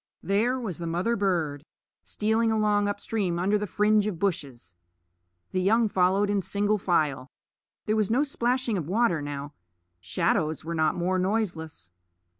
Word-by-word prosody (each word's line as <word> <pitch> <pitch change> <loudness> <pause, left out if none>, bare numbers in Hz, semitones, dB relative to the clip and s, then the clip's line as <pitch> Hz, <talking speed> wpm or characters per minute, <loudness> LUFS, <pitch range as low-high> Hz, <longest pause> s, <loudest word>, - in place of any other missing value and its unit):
There 230 +7 +1
was 200 -10 -5
the 170 - -4
mother 180 +8 0
bird, 165 -9 -1 0.4
stealing 220 +1 +1
along 210 -2 +2
up 205 0 -2
stream 195 -6 -1
under 200 +4 +1
the 210 - -3
fringe 210 +2 +2
of 200 -5 -3
bushes. 140 - -3 0.8
The 185 - 0
young 220 +4 +3
followed 190 +2 +2
in 200 -1 +1
single 205 +2 0
file. 150 -8 0 0.6
There 215 - +1
was 215 -3 +1
no 250 +6 +3
splashing 250 -5 0
of 155 - -5
water 195 -6 +2
now. 145 0 -6 0.5
Shadows 160 - -1
were 170 - -3
not 155 -1 +1
more 185 +2 0
noiseless. 180 - -2
195 Hz, 155 wpm, -27 LUFS, 165-215 Hz, 0.8 s, young